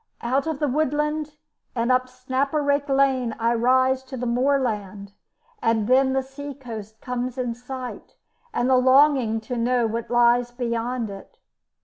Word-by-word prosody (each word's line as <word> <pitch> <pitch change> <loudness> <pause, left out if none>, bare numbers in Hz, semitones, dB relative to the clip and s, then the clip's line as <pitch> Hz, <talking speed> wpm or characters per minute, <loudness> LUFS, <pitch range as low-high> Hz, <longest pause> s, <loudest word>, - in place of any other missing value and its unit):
Out 265 +5 0
of 320 -3 -2
the 295 - 0
woodland 300 +2 -1 0.4
and 235 +1 +1
up 255 0 +2
Snaperake 280 +3 -1
Lane 265 -4 +2
I 230 +1 +1
rise 260 +2 +3
to 260 0 -7
the 250 - -3
moorland, 230 -6 -1 0.5
and 225 -2 +1
then 265 +1 +4
the 265 0 +1
sea 280 +1 -8
coast 220 -5 -9
comes 250 0 -3
in 245 -2 -1
sight, 250 +1 -8 0.4
and 245 - 0
the 260 -1 +4
longing 260 -3 +4
to 245 +3 -5
know 240 0 +1
what 225 +1 -3
lies 240 0 +3
beyond 240 -1 -3
it. 195 0 -11
255 Hz, 150 wpm, -24 LUFS, 235-270 Hz, 0.5 s, then